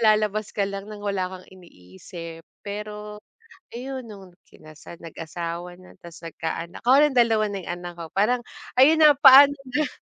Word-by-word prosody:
lalabas 215 0 -3
ka 205 - 0
lang 200 0 -5
ng 210 -1 -10
wala 200 -3 -2
kang 185 0 -11
iniisip. 165 - -12 0.2
Pero 210 +1 -7 0.5
ayun, 260 +2 -7
noong 195 -5 -13
kinasal, 155 +2 -15
nag-asawa 170 +2 -7
na 185 - -17
'tas 170 -1 -12
nagkaanak 165 +1 -7
ako 255 +4 +5
rin 295 -2 +3
2 225 -3 +3
na 200 -2 -6
'yong - - -5
anak 175 0 -9
ko, 170 -1 -8
parang 240 +5 0 0.3
ayun 290 +6 +5
na, 300 -2 +7
paano 280 0 +8 0.2
na, 295 +3 0
200 Hz, 160 wpm, -23 LUFS, 175-240 Hz, 0.5 s, paano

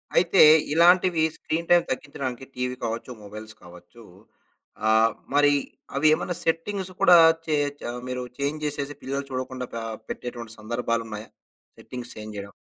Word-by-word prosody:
అయితే, 180 +2 +4 0.3
ఇలాంటివి 175 +1 +5
screen 165 +2 -3
time 175 0 +5
తగ్గించడానికి 135 -3 -4
టీవీ 125 0 -2
కావచ్చు, 115 +2 -4
మొబైల్స్ 110 +2 -9
కావచ్చు. 90 +5 -15 0.9
ఆహ్, 110 +1 +5 0.2
మరి 145 0 +5 0.4
అవి 145 +3 +3
ఏమైనా 175 +3 -2
సెట్టింగ్స్ 185 +4 -2
కూడా 180 -3 +8 0.3
చేయచ్చ 145 -2 -1 0.3
మీరు 125 0 -3 0.2
చేంజ్ 145 +2 -2
చేసేసి 145 -1 -3
పిల్లలు 140 +1 -3
చూడకుండా 130 0 -4
పా 115 - -4 0.3
పెట్టేటువంటి 120 -2 -6
సందర్భాలున్నాయా? 115 -1 -3 0.5
సెట్టింగ్స్ 125 -1 -8
చేంజ్ 110 0 -8
జేయడం. 100 0 -7
130 Hz, 130 wpm, -25 LUFS, 115-155 Hz, 0.9 s, కూడా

